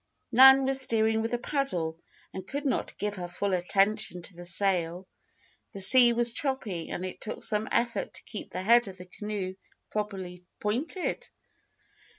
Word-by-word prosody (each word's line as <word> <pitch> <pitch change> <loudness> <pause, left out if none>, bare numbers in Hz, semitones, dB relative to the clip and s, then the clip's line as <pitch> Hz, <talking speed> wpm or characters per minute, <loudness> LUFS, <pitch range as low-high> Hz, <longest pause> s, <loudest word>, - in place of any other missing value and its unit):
'" - - -50
Nan 265 0 +8
was 270 0 +3
steering 220 -2 +1
with 225 - -3
a 240 - 0
paddle 180 - -3 0.3
and 190 0 -8
could 285 +5 -5
not 270 - -2
give 205 -1 -4
her 175 -1 -5
full 190 +3 -3
attention 195 +1 0
to 180 - -9
the 175 0 -9
sail. 180 -1 +1 0.7
The 195 - -6
sea 240 +5 +8
was 235 0 +2
choppy 235 - -2
and 185 - -5
it 185 - -8
took 215 - -5
some 215 0 0
effort 235 0 -2
to - - -7
keep 215 - -8
the 185 - -5
head 235 +2 +4
of 190 -1 -10
the 180 - -11
canoe 195 0 -6 0.4
properly 190 -4 -5 0.2
pointed. 265 - -3
210 Hz, 170 wpm, -27 LUFS, 185-240 Hz, 0.7 s, Nan